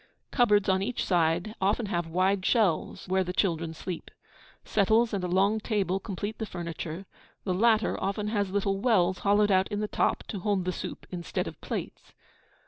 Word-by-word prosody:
Cupboards 210 -6 +3
on 190 -1 +2
each 230 +5 -2
side 175 +3 +1
often 205 +4 +1
have 175 -4 -2
wide 185 +3 +1
shelves, 195 -7 +1
where 190 +1 +2
the 180 - -4
children 170 -4 0
sleep. 175 +1 -6 0.6
Settles 220 +3 +2
and 195 -2 -1
a - - 0
long 195 +4 +2
table 195 -4 0
complete 205 +2 -5
the 220 - -3
furniture; 170 0 -6 0.4
the 185 - -1
latter 220 +3 +2
often 205 +2 -1
has 205 -3 0
little 195 0 0
wells 190 -6 +2
hollowed 205 +1 +3
out 190 0 +3
in 205 - -3
the 210 - -1
top - - 0
to 200 - -4
hold 195 -1 0
the 185 - 0
soup - - -6
instead 175 -3 -3
of - - -9
plates. - - -6
195 Hz, 180 wpm, -28 LUFS, 180-210 Hz, 0.6 s, Cupboards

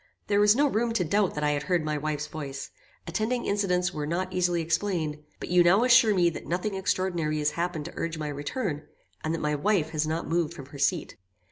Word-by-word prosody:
There 205 -1 +2
was 210 +1 +6
no 285 +3 +4
room 235 -3 +1
to 200 - +1
doubt 195 +3 +1
that 150 - -2
I 150 - +3
had 145 -1 -1
heard 175 -1 0
my 155 0 -1
wife's 150 0 -2
voice; 140 -3 -6 0.3
attending 220 +8 -1
incidents 180 -3 +1
were 150 -1 -3
not 185 +3 -2
easily 175 -1 +1
explained; 165 -3 -1 0.2
but - - -6
you 180 0 +5
now 190 +6 +5
assure 240 -4 +6
me 175 -2 +3
that - - -8
nothing 180 +4 -1
extraordinary 180 -5 -1
has 150 0 +1
happened 170 -2 -3
to 170 - -7
urge 165 -1 -3
my 155 -1 -3
return, 145 - -3 0.4
and 155 - -1
that 165 - -5
my 150 0 0
wife 160 +1 +1
has 155 -1 0
not 160 +2 -2
moved 170 0 0
from 140 -5 -9
her 140 +1 -12
seat." 160 +3 0
170 Hz, 225 wpm, -27 LUFS, 150-190 Hz, 0.4 s, was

